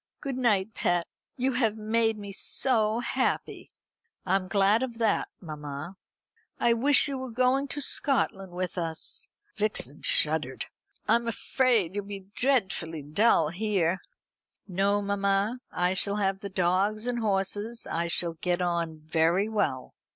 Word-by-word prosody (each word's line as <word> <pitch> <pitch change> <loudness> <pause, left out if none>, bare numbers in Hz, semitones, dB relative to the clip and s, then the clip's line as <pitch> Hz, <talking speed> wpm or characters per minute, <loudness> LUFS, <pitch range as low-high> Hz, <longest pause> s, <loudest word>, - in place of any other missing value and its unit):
Good 275 -3 -4
night, 220 -5 +1
pet. 175 -3 0 0.3
You 260 +1 +1
have 230 -4 +1
made 225 +1 +1
me 200 -1 -7
so 220 +1 +1
happy." - - -2 0.6
"I 190 0 +2
am 190 -1 -1
glad 200 +3 +3
of 245 -3 -4
that, 225 -2 +1
mamma." 150 +1 -7 0.6
"I 235 - +4
wish 275 +6 +4
you 275 -2 -3
were 260 0 -5
going 255 +4 +2
to 280 +2 -2
Scotland 215 -9 +1
with 180 +1 -3
us." 165 -2 -4 0.3
(Vixen 215 0 +2
shuddered.) - - +2 0.4
"I'm 235 0 +2
afraid 230 -5 +1
you'll 205 0 -3
be 200 -1 -8
dreadfully 190 - 0
dull 160 +1 +3
here." 185 -1 0 0.7
"No, 200 +2 +1
mamma; 200 +3 0
I 180 +1 +1
shall 200 +1 0
have 195 -2 0
the 200 -1 -6
dogs 190 +4 +1
and 245 -1 -1
horses. 205 +2 -1
I 170 +1 -2
shall 170 0 0
get 175 +2 -1
on 170 -3 -1
very 165 +5 +1
well." 145 -13 -2
200 Hz, 145 wpm, -28 LUFS, 180-230 Hz, 0.7 s, I